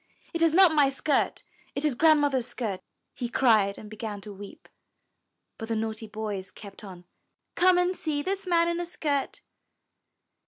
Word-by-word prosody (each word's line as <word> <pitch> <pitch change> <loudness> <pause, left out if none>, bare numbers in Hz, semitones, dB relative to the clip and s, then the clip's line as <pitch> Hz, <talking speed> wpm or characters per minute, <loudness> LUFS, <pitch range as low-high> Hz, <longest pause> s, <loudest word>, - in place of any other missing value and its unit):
It 335 - -2
is 330 -1 +4
not 370 -3 +7
my 290 -3 +4
skirt, 275 +1 0 0.3
it 280 - -1
is 300 - +2
Grand 310 +4 +5
mother's 265 -4 +1
skirt!" 220 -6 -4 0.3
he 240 - -4
cried, 215 -6 +3
and 215 - -10
began 215 -1 -6
to 210 0 -9
weep. 200 0 -12 0.9
But 225 - -5
the 225 - 0
naughty 220 0 -3
boys 210 -3 -5
kept 200 +1 -12
on. 180 -3 -11 0.5
Come 365 0 +4
and 360 +1 +1
see 295 -4 -2
this 390 +2 -3
man 340 -1 +3
in 340 0 -1
a 350 - -2
skirt." 290 -5 -3
260 Hz, 170 wpm, -27 LUFS, 215-325 Hz, 0.9 s, not